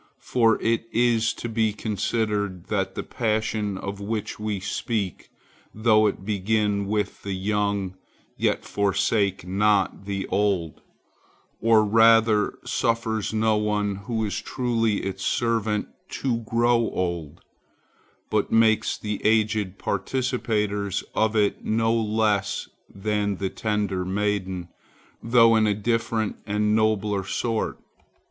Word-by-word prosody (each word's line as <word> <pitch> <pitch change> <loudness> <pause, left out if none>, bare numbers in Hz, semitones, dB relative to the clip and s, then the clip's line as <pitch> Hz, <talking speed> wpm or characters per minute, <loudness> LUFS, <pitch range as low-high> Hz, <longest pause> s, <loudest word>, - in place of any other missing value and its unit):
For 115 -3 +3
it 115 0 +1
is 115 -1 +2
to - - -5
be 110 -2 +1
considered 105 -3 -2
that - - -1
this - - -4
passion 110 -2 -1
of 100 +1 -5
which 105 +1 -4
we 105 -2 -2
speak, 100 -1 -3 0.5
though 110 -1 +4
it 95 -2 -3
begin 105 0 0
with 105 0 -2
the 100 - -4
young, 100 -1 -1 0.4
yet - - 0
forsakes 100 0 +1
not 100 +1 +1
the 100 -1 -3
old, 95 -6 0 0.8
or 110 -1 +5
rather 115 0 +4
suffers 115 -2 0
no 110 0 +2
one 105 -2 0
who 110 +2 -2
is 100 - -3
truly 115 -4 0
its 95 0 -4
servant 110 -3 0 0.3
to 125 -4 -1
grow 115 +1 +2
old, 85 -4 -3 0.9
but 105 -1 0
makes 110 -1 +3
the 105 -1 -4
aged 105 -3 +1
participators 105 -4 -1
of 110 0 +1
it 105 -2 +1
not 115 +1 +1
less 105 -3 0 0.2
than 105 0 -1
the 95 0 -3
tender 105 -4 -1
maiden, 95 -2 -2 0.5
though 115 -1 +5
in 110 -1 +3
a 105 - +2
different 115 0 -1
and 105 +1 +1
nobler 105 -2 +1
sort. 115 +3 -2
105 Hz, 120 wpm, -25 LUFS, 100-110 Hz, 0.9 s, or